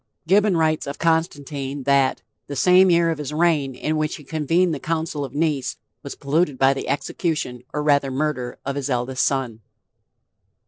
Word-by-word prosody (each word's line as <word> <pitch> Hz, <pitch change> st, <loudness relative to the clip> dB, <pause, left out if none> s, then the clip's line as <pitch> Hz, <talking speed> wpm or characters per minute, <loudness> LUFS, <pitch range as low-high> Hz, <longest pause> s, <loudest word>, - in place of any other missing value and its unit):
Gibbon 195 Hz, +1 st, +3 dB
writes 155 Hz, -2 st, +1 dB
of 140 Hz, -, -5 dB
Constantine 145 Hz, -4 st, -1 dB
that 135 Hz, -1 st, +2 dB, 0.2 s
"the 145 Hz, -, -5 dB
same 185 Hz, +5 st, +5 dB
year 170 Hz, -1 st, +3 dB
of 160 Hz, -, -4 dB
his 150 Hz, -1 st, -4 dB
reign 150 Hz, -4 st, +1 dB
in 155 Hz, +4 st, -2 dB
which 155 Hz, 0 st, -1 dB
he 150 Hz, -, -12 dB
convened 165 Hz, +4 st, +1 dB
the 145 Hz, -, -4 dB
council 160 Hz, -1 st, -2 dB
of 135 Hz, 0 st, -7 dB
Nice 150 Hz, -4 st, -1 dB, 0.2 s
was -, -, -7 dB
polluted 145 Hz, 0 st, 0 dB
by 135 Hz, +1 st, +4 dB
the 135 Hz, -, -5 dB
execution, 140 Hz, -3 st, -2 dB
or 150 Hz, -, -2 dB
rather 140 Hz, -2 st, +3 dB
murder, 130 Hz, -2 st, -2 dB
of 140 Hz, 0 st, -2 dB
his 140 Hz, 0 st, -3 dB
eldest 130 Hz, +1 st, 0 dB
son." 130 Hz, -5 st, -1 dB
150 Hz, 175 wpm, -22 LUFS, 135-160 Hz, 0.2 s, same